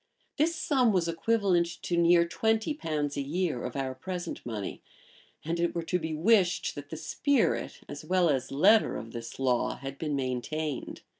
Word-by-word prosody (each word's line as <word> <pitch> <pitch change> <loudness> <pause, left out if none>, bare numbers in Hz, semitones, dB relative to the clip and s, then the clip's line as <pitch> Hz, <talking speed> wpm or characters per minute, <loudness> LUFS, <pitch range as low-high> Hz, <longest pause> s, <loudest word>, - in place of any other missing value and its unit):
[*] - - -43
This 330 +3 +2
sum 265 -7 +2
was 180 -4 +1
equivalent 180 0 +2 0.2
to 175 - -1
near 170 0 +5
twenty 220 - +1
pounds 150 - -2
a - - 0
year 155 -2 -1
of 125 - -5
our 135 -1 -2
present 175 +7 -5
money, 110 -5 -5 0.6
and 165 +2 -1
it 170 0 0
were 170 - -1
to 180 +2 0
be 160 -1 -3
wished, 185 +1 +3
that 145 0 -9
the 160 - -6
spirit, 280 - 0
as 145 +1 -8
well 180 +2 +2
as 135 -5 0
letter, 205 +11 +4
of 115 - -8
this 115 0 -7
law 125 -2 +1
had 135 +1 -8
been 150 -3 -1
maintained. 135 +2 -3
165 Hz, 180 wpm, -29 LUFS, 140-185 Hz, 0.6 s, near